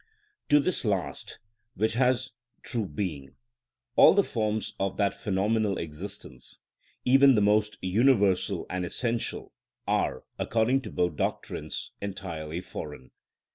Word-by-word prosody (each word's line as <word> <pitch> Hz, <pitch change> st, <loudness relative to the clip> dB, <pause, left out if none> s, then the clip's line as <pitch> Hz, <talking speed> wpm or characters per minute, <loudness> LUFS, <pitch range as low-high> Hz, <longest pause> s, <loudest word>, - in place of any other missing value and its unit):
To 145 Hz, -, +7 dB
this 180 Hz, +5 st, 0 dB
last, 95 Hz, -, -2 dB, 0.4 s
which 110 Hz, +1 st, +1 dB
has 125 Hz, +1 st, +1 dB, 0.3 s
true 115 Hz, -6 st, -2 dB
being, 75 Hz, -5 st, -5 dB, 0.6 s
all -, -, +8 dB
the -, -, +5 dB
forms 110 Hz, -1 st, -2 dB
of 95 Hz, -1 st, -1 dB
that 100 Hz, -1 st, +2 dB
phenomenal 105 Hz, +1 st, 0 dB
existence, 85 Hz, -3 st, -7 dB, 0.5 s
even 135 Hz, +1 st, +6 dB
the -, -, +4 dB
most 105 Hz, +1 st, +2 dB
universal 100 Hz, -1 st, +2 dB
and 90 Hz, 0 st, -3 dB
essential, 115 Hz, +6 st, -2 dB, 0.3 s
are, -, -, 0 dB, 0.2 s
according 115 Hz, +4 st, +2 dB
to -, -, -7 dB
both 90 Hz, 0 st, 0 dB
doctrines, -, -, -3 dB
entirely 85 Hz, -5 st, -5 dB
foreign. 75 Hz, -7 st, -8 dB
100 Hz, 120 wpm, -28 LUFS, 90-115 Hz, 0.6 s, all